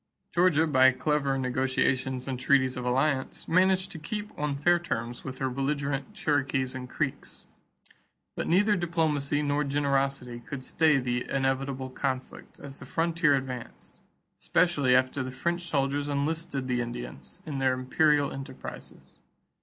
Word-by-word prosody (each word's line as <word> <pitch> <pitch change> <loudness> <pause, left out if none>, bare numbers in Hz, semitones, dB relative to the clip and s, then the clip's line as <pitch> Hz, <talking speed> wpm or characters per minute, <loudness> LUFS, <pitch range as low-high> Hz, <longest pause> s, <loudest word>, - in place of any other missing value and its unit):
Georgia, 170 -3 +4
by 130 -4 +5
clever 140 0 0
negotiations 130 0 0
and 130 -2 -3
treaties 130 -1 +3
of 125 - -4
alliance, 130 +2 0
managed 185 +2 +3
to 160 - -6
keep 210 +7 -5
on 150 -1 -2
fair 175 +5 +3
terms 120 -8 -4
with 130 -1 -6
her 135 - -1
belligerent 140 +3 -2
Cherokees 140 -8 0
and 130 -1 -7
Creeks. - - -4 0.9
But - - -3
neither 205 +5 +4
diplomacy 155 -5 0
nor 145 0 +1
generosity 140 -3 0
could 130 +2 -7
stay 155 +1 +3
the 125 -1 -2
inevitable 135 -1 -1
conflict 130 0 -4
as 140 -1 -9
the - - -9
frontier 165 -3 +2
advanced, 130 -3 -6 0.4
especially 145 -8 +3
after 130 +2 +2
the 130 - -3
French 170 +7 -2
soldiers 140 -1 0
enlisted 145 -1 -2
the 125 -1 0
Indians 120 +9 -7
in 145 -4 -4
their 130 -1 +2
imperial 145 +3 +2
enterprises. 135 0 -9
140 Hz, 140 wpm, -28 LUFS, 130-155 Hz, 0.9 s, by